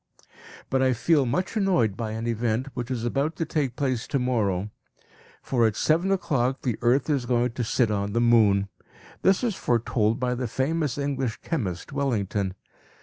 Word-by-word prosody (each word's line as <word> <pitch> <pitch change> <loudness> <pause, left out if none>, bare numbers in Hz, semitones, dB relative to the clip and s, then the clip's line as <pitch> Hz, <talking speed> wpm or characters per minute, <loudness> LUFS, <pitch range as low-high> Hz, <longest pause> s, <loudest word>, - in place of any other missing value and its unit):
But 130 - +2
I 130 -1 +3
feel 140 +2 +2
much 180 - -1
annoyed 180 - +2
by 110 -1 -4
an 110 +1 -4
event 120 +2 -1
which 120 -1 -5
is 120 -3 -2
about 140 +6 0
to 165 - -2
take 145 -6 -1
place 130 -3 -1
to - - 0
morrow; 105 -6 0 0.8
at 115 -5 +3
seven 170 +9 +2
o'clock 135 -9 0
the 120 -5 0
earth 125 +3 +2
is 140 -5 0
going 120 -1 +1
to 120 +1 -3
sit 115 0 +1
on 100 -1 -1
the 115 - +1
moon. 110 -4 +4 0.5
This 190 +4 +3
is 235 -3 +1
foretold 115 - 0
by 125 -1 0
the 125 0 -2
famous 145 +3 -1
English 135 -5 -2
chemist, 105 - -3
Wellington. 105 -8 -1
125 Hz, 170 wpm, -25 LUFS, 115-140 Hz, 0.8 s, moon